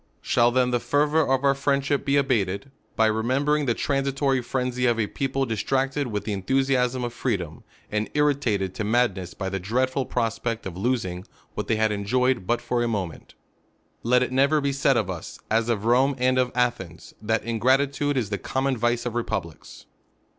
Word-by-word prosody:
Shall 120 -1 +3
then 125 0 +2
the 120 - +1
fervour 150 +4 +2
of 135 0 +2
our 140 -1 +4
friendship 140 +1 0
be 140 0 +2
abated, 110 -3 0 0.2
by 110 - +3
remembering 135 +7 +1
the 120 - +2
transitory 135 -1 0
frenzy 125 0 -1
of 120 -1 +1
a 110 - +2
people 135 +4 -2
distract 135 +4 -1
ed 145 -2 -1
wit^ 105 -3 -3
the 105 - -3
enthusiasm 130 +4 +1
of 120 -1 -3
freedom, 90 - -3 0.3
and 105 0 -1
irritated 130 -11 +1
to 105 - -3
madness 105 -5 0
by 95 - -4
the 95 0 -2
dreadful 130 +7 -1
prospect 115 -1 -2
of 95 -2 -5
losing 95 -4 -2 0.3
what - - -4
Uiey 115 - +2
had 110 0 +2
enjoyed 120 +1 0
but 120 - +1
for 120 -1 0
a 120 - +1
moment? 95 -9 -4 0.7
Let 125 +2 +3
it 125 - -3
nevc^r 140 +3 +3
be 140 - +1
said 135 -1 +2
of 110 -5 0
us, 90 -4 -6
as 115 +1 +2
of 110 -3 -1
Rome 130 +4 +3
and 130 0 +2
of 125 -1 +1
Athens, 95 -9 -2
that 110 0 0
ingratitude 135 +5 +1
is 110 -5 -1
the 100 - -2
common 135 0 -1
vice 120 +1 0
of 120 - -2
republics. 100 -9 -5
125 Hz, 185 wpm, -25 LUFS, 110-135 Hz, 0.7 s, our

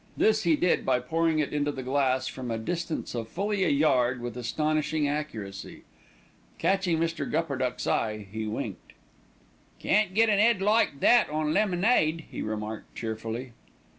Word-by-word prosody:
This 215 0 +3
he 165 -2 +4
did 175 +4 +1
by 125 - +2
pouring 160 +5 0
it 150 -1 -1
into 145 0 0
the 135 -2 -6
glass 130 -1 +1
from 125 -2 -6
a 115 - -1
distance 170 +7 -3
of 115 -2 -4
fully 200 +1 -1
a 175 - +2
yard 135 -4 +3
and 120 - -10
with 120 -1 -5
astonishing 150 +4 0
accuracy. 115 -10 -5 0.7
Catching 185 -1 +1
Mr. 165 +1 -2
Gupperduck's 140 -6 -1
eye, 105 -2 -1
he 110 0 -4
winked. 105 - -5 0.8
"Can't 205 -3 +1
get 225 +1 +5
an 205 -2 +3
'ead 230 -1 +4
like 205 -8 +2
that 240 - +5
on 155 0 -1
lemonade," 180 -4 +2
he - - -5
remarked 110 0 -5
cheerfully. 115 +2 -5
150 Hz, 160 wpm, -27 LUFS, 125-175 Hz, 0.8 s, get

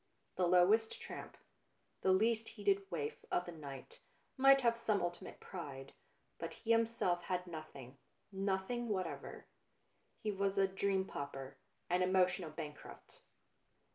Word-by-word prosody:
The 180 - +2
lowest 190 +6 +4
tramp, - - -8 0.6
the 190 - +4
least 220 +3 +3
heeded 200 -2 0
waif 150 -5 -3
of 175 - +1
the 175 - -6
night, 155 - -9 0.4
might 270 0 +7
have 235 -2 +3
some 225 -3 +1
ultimate 175 +1 -4
pride, 140 -7 -7 0.5
but - - -4
he 230 - -2
himself 230 -6 +2
had 180 -1 -1
nothing, 140 -6 -9 0.3
nothing 195 +5 -1
whatever. 185 -5 -3 0.7
He 215 - -2
was 200 0 0
a 195 0 +5
dream 190 0 0
pauper, 135 -4 -6 0.3
an 180 +1 +2
emotional 180 -2 +3
bankrupt. 150 -1 -9
190 Hz, 130 wpm, -37 LUFS, 170-210 Hz, 0.7 s, might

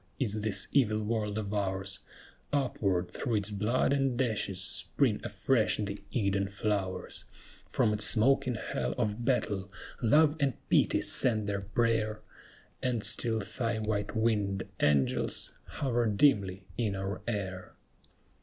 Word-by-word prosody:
is 110 -5 -1
this 100 -3 -1
evil 110 -6 +3
world 105 -1 -1
of 105 -1 -3
ours; 95 -1 -2 0.5
Upward, 100 -10 0
through 120 -5 -2
its 105 0 -1
blood 110 +6 +1
and 135 -3 +1
ashes, 110 -7 0
spring 110 +4 +1
afresh 110 +3 +1
the 100 -1 -4
Eden 100 -3 0
flowers; 100 -2 -3 0.4
From 105 - +2
its 105 0 +1
smoking 125 +2 +3
hell 65 - -3
of 105 +2 -1
battle, 100 -7 0 0.3
Love 150 +6 +5
and 140 -3 +2 0.2
Pity - - +3
send 110 -4 +2
their 100 -1 -2
prayer, 110 +1 0 0.6
And 120 -4 -1
still 110 -2 0
thy 115 +3 -2
white 105 0 -2
winged 105 -4 +1 0.2
angels 70 -2 +1
hover 120 -4 -1
dimly 100 -4 +2 0.2
in 105 -4 0
our 95 +1 -4
air! 95 -5 -4
105 Hz, 130 wpm, -30 LUFS, 100-120 Hz, 0.6 s, Love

